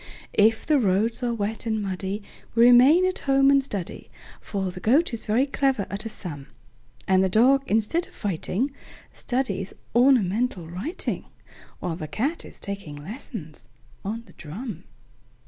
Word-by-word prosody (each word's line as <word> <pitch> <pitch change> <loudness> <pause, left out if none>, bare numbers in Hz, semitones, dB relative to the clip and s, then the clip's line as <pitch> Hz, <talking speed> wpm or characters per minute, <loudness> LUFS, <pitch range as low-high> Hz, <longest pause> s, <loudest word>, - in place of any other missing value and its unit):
If 220 +1 +3
the 300 -2 +3
roads 220 +2 +1
are 245 -1 0
wet 220 0 -3
and 220 -1 +1
muddyWe 195 0 -3 0.3
remain 245 +9 +7
at 370 0 -1
home 275 0 +5
and 275 -1 +4
study,—For 195 -2 -6
the 180 - -8
Goat 265 - +3
is 225 - -5
very 230 +6 +3
clever 270 -6 0
at 200 +3 -4
a - - -3
sum,—And 170 - -4
the 190 - +2
Dog, 255 +8 +5
instead 225 - +1
of - - -21
fighting, 205 - -1 0.4
Studies 245 -7 -2 0.2
ornamental 235 -6 +3
writing, 195 - -4 0.6
While 170 -2 -3
the 155 - -5
Cat 270 - -2
is - - -11
taking 195 -7 -6
lessons 155 - -8 0.4
on 225 +4 -4
the - - -18
drum. 185 - -7
220 Hz, 145 wpm, -25 LUFS, 190-255 Hz, 0.6 s, remain